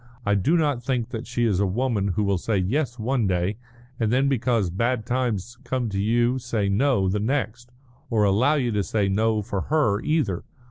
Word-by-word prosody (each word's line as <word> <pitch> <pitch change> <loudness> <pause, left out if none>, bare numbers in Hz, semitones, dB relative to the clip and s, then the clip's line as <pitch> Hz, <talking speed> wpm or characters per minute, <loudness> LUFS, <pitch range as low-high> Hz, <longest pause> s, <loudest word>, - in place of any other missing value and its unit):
I 105 - +2
do 105 - +2
not 145 -6 +1
think 125 -2 -2
that 115 +2 -6
she 120 0 -1
is 100 -5 +1
a 100 - +2
woman 110 0 0
who 105 +2 0
will 100 -2 +1
say 110 +3 -1
'yes' 120 +7 -1
one 120 -1 0
day, 90 +3 0 0.4
and 110 -2 +1
then 135 +3 +3
because 120 -7 +1
bad 115 +4 -1
times 120 -2 -2
come 125 -2 -2
to 100 -1 -2
you 120 +4 +2
say 115 -5 -1
'no' 105 -1 +2
the 100 +3 0
next, 120 0 -2 0.4
or 110 -3 +2
allow 110 +9 +3
you 125 -5 0
to 105 -1 0
say 100 +2 0
'no' 110 +2 +1
for 100 -1 -3
her, 140 -10 +1
either. 145 - 0
115 Hz, 200 wpm, -24 LUFS, 100-125 Hz, 0.4 s, then